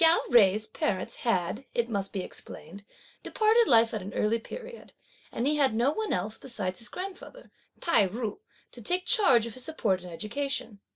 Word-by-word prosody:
Chia 330 +1 +8
Jui's 215 -2 +5
parents 200 -3 -2
had, 215 +1 -1
it 235 -1 +1
must 200 -4 -2
be 195 - -3
explained, 185 +4 -7 0.4
departed 445 +1 +3
life 230 -1 +5
at 215 - -2
an 195 +2 -8
early 220 +2 +1
period, 475 - -10 0.4
and 235 - -2
he 300 +2 +2
had 270 -6 +3
no 240 +5 +2
one 435 +7 -3
else, 200 +4 -2
besides 195 -8 -4
his 235 - -7
grandfather 390 - -8 0.3
Tai 335 - +4
ju, 225 - -4 0.3
to - - -10
take 360 +1 +1
charge 275 - +5
of 230 - -7
his 255 - -8
support 210 - -1
and 180 -1 -10
education. 240 +3 -3
230 Hz, 180 wpm, -28 LUFS, 205-305 Hz, 0.4 s, Chia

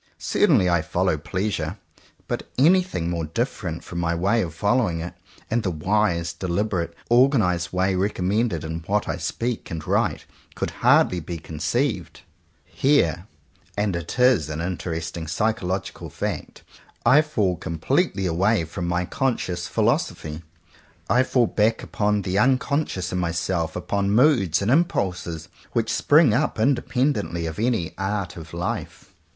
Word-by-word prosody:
Certainly 135 - +3
I 85 -2 +3
follow 85 +2 0
Pleasure; 95 +2 -3 0.5
but - - -4
anything 175 - +3
more 85 -2 -2
different 90 - -3
from 85 - -6
my 85 0 0
way 100 +7 +2
of 80 -5 -4
following 105 -3 +1
it, 85 +2 -5 0.4
and 120 +1 +2
the 95 - -1
wise, 85 0 0
deliberately 90 -2 -2
or 125 +3 +6
ganized 90 -10 0
way 95 +1 +1
recommended 95 0 0
in 80 +1 -4
what 105 +1 +1
I - - -2
speak 115 +8 -3
and 80 -2 -5
write, - - 0 0.3
could - - -2
hardly 90 - +4
be 85 +1 -6
conceived. 85 - -2 0.4
Here 95 - +1 0.2
— - - -32
and 105 -3 0
it 85 +6 -5
is 125 - +4
an 75 0 -4
interesting 85 -2 -4
psycholog 95 0 -1
ical - - -9
fact - - -5 0.2
— - - -32
I 150 +4 +7
fall 105 -12 0
completely 85 +4 -1
away 95 +2 +2
from 85 +2 -5
my 90 +1 0
conscious 95 -8 -2
philosophy. 75 0 -1 0.7
I 125 +3 +5
fall 125 -1 +2
back 110 +1 +1
upon 105 -2 0
the 95 +2 0
unconscious 130 - +1
in 90 - 0
myself, 85 -1 -1
upon 100 +2 -1
moods 105 - +3
and 105 - +1
im 160 +6 +6
pulses 85 - -3 0.3
which 115 -2 0
spring 145 -5 +5
up 110 - 0
independently 125 - 0
of 80 +2 -5
any 110 -7 0
art 95 -2 -2
of 80 -1 -10
life. 85 +1 -5
95 Hz, 150 wpm, -23 LUFS, 85-115 Hz, 0.7 s, I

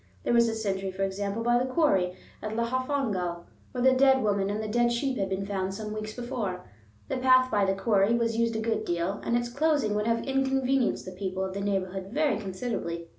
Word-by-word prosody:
There - - +1
was 235 -1 +5
a 225 - -2
sentry, 195 -3 -2
for 190 +1 -3
example, 200 +3 -2
by 240 +1 +3
the 255 +1 -1
quarry 195 - +2 0.3
at 215 0 -4
Llanfihangel, 235 -8 -1 0.3
where 250 -1 -2
the 260 - +6
dead 265 -1 +4
woman 200 -2 +1
and 205 +1 -2
the 215 - -3
dead 240 +2 +2
sheep 260 +3 -1
had 195 -1 -1
been 190 +1 -2
found 195 -1 -2
some 210 0 -5
weeks 215 0 -5
before. 215 -7 -4 0.4
The - - -2
path 255 0 +4
by 205 -2 +3
the 195 0 +1
quarry 205 +1 +3
was 230 -1 0
used 230 0 +1
a 220 - -1
good 225 0 -1
deal, 175 +3 -2
and 235 - +1
its 240 0 -2
closing 280 -4 +1
would 210 +1 0
have 230 0 0
inconvenienced 270 -1 +1
the 185 - -6
people 190 0 -3
of 190 - -5
the 200 - -4
neighborhood 190 -1 -2
very 285 0 +1
considerably. 185 -5 -4
215 Hz, 220 wpm, -28 LUFS, 195-245 Hz, 0.4 s, the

